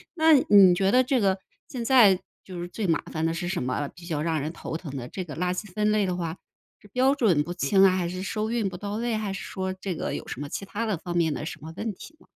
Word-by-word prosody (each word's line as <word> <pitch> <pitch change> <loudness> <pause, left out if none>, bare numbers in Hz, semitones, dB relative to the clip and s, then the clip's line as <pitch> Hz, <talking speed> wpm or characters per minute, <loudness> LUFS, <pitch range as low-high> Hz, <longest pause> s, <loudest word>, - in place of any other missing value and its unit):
那 320 -1 +5
你 200 -9 +7
觉 190 +2 +2
得 255 +4 +5
这 250 -2 +1
个 195 -1 +2 0.3
现 240 -4 -5
在 220 -8 +6 0.2
就 180 -2 -8
是 175 - -4
最 200 +2 -3
麻 165 - +2
烦 160 0 -2
的 165 - +2
是 175 +1 -3
什 180 -1 -2
么？ 130 +3 -1
比 175 -1 -14
较 155 -4 -2
让 160 -3 0
人 155 +3 -3
头 160 - -6
疼 150 -4 -6
的。 125 -1 -5
这 185 - -5
个 150 -5 -8
垃 180 +1 0
圾 190 +1 -6
分 210 0 +2
类 210 -3 +2
的 180 0 -2
话， 165 -1 -3 0.4
是 205 - -17
标 260 +6 +2
准 190 - +3
不 175 +3 -5
清 190 +4 +3
啊， 190 - +7
还 175 -2 -1
是 185 +1 -5
收 215 +2 -2
运 230 -4 0
不 185 - -5
到 205 +2 -5
位， 235 0 -1
还 210 -2 -2
是 195 - -5
说 190 0 -4
这 190 0 -4
个 - - -3
有 - - -7
什 135 - -6
么 145 - -5
其 195 - -5
他 220 +3 -3
的 200 -5 0
方 175 +1 -6
面 165 -2 +2
的 150 - -4
什 155 - -6
么 160 +1 -8
问 220 -2 -3
题 315 - -13
吗？ - - -22
190 Hz, 310 characters per minute, -26 LUFS, 170-215 Hz, 0.4 s, 你